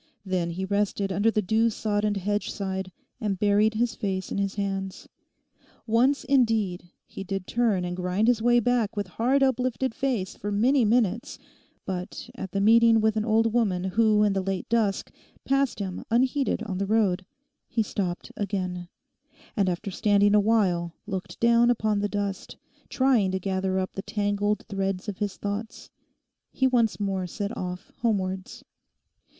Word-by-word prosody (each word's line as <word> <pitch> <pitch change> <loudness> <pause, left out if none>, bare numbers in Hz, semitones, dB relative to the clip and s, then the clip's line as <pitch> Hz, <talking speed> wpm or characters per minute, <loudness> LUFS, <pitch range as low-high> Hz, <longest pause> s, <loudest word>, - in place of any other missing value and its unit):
Then 185 -3 -1
he 185 +3 -3
rested 200 0 0
under 200 +5 +2
the 215 -1 0
dew 220 +4 +2
sodden 210 -1 -1
hedgeside 195 -1 -2 0.3
and 205 -5 -1
buried 210 +2 +3
his 235 +1 +1
face 190 -2 -3
in - - -1
his 200 0 -1
hands. 195 -2 -4 0.8
Once, 250 +5 +2
indeed, 225 -9 +1 0.2
he - - -8
did 195 -1 -4
turn 220 -6 +1
and 175 0 -3
grind 180 +4 0
his 240 -2 +3
way 240 +1 +4
back 235 -2 0
with 205 - 0
hard 250 +9 +1
uplifted 255 -1 0
face 235 -9 -2
for 205 - -5
many 245 +6 +3
minutes, 225 -1 +1 0.5
but 185 +5 -5
at 190 -6 -7
the 200 - -1
meeting 225 +2 +6
with 220 0 +2
an 215 - 0
old 225 0 +2
woman 200 -7 +1
who 210 +2 +3
in 205 -1 +3
the 195 - 0
late 190 0 -3
dusk 220 -4 0 0.3
passed 275 -1 +1
him 190 -3 -4
unheeded 255 0 +1
on 190 -4 -4
the 200 - -1
road, 200 -4 +2 0.4
he 225 - 0
stopped 185 -4 -4
again, 185 -3 -3 0.7
and 200 -5 +2
after 185 +3 -3
standing 205 +1 +3
awhile 200 -6 +2
looking 185 -2 -5
down 235 0 +4
upon 215 -3 +1
the 205 0 -1
dust, 200 -2 -4 0.3
trying 255 -7 +3
to 190 0 -1
gather 190 0 -1
up 185 0 -2
the 195 - -4
tangled 205 0 -1
threads 195 0 -2
of 200 -3 -5
his 205 -2 -2
thoughts, 205 +2 -5 0.6
he 265 - 0
once 235 -5 +2
more 195 -2 -1
set 205 +5 -4
off 180 0 -6
homewards. 190 -5 -2
205 Hz, 160 wpm, -26 LUFS, 190-225 Hz, 0.8 s, meeting